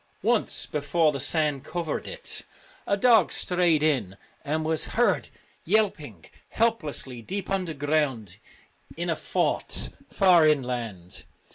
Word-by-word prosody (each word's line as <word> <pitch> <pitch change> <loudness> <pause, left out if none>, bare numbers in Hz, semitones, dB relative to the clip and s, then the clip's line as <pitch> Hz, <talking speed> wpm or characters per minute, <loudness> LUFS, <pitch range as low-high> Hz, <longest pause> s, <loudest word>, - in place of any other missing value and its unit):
Once, - - 0
before 155 +2 +1
the 140 - -4
sand 145 -1 0
covered 170 -4 -4
it, - - -5 0.5
a 200 - +2
dog 225 -3 +5
strayed 175 -4 +2
in, 125 -11 0 0.3
and 155 +2 -1
was 160 0 +1
heard 240 - +2 0.3
yelping 155 - 0 0.2
helplessly 155 - -1
deep 195 - -5
underground 145 - -1 0.6
in - - -1
a - - 0
fort - - -1 0.2
far 180 -5 +5
inland. 120 - -2
155 Hz, 115 wpm, -26 LUFS, 135-180 Hz, 0.6 s, dog